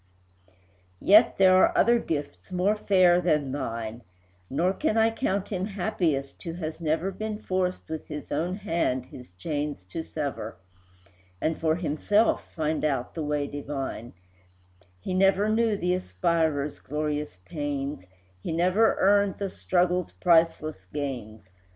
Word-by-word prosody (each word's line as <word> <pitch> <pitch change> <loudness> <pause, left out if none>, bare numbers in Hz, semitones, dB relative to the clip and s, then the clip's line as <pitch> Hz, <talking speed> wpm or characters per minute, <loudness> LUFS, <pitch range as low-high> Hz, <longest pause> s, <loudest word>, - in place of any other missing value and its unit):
II. - - -32 0.5
Yet 215 +4 +7
are - - -27
there 185 -1 +5
other 235 0 +5
gifts 145 - -5
more 185 +4 +2
fair 185 -4 +4
than 150 -6 +1
thine, 115 -4 -4 0.5
Nor 175 +7 +1
can 225 -1 0
I 225 0 +4
count 200 -4 -1
him 185 -2 -2
happiest 175 -9 -1
who 165 - -5
has 160 -1 -5
never 165 +4 0
Been 215 +2 -4
forced 185 -2 -2
with 160 -1 -6
his 150 -2 -7
own 170 +5 -1
hand 165 - -1
his 125 -3 -12
chains 145 - -4
to 165 - -3
sever, 140 - -5 0.8
And 160 - -1
for 160 -1 +2
himself 175 +7 +1
find 155 -1 -1
out 135 -5 -1
the 165 - -4
way 150 -1 -1
divine; 140 -4 -5 0.9
He 140 - -4
never 195 +2 +3
knew 220 -1 +2
the 180 -1 0
aspirer's 155 - 0
glorious 150 -3 -3
pains, 145 - -4 0.3
He - - -4
never 185 +7 +3
earned 200 0 +3
the 200 -1 -2
struggle's 180 0 0
priceless 160 - +2
gains. 110 -5 -6
160 Hz, 140 wpm, -27 LUFS, 145-185 Hz, 0.9 s, Yet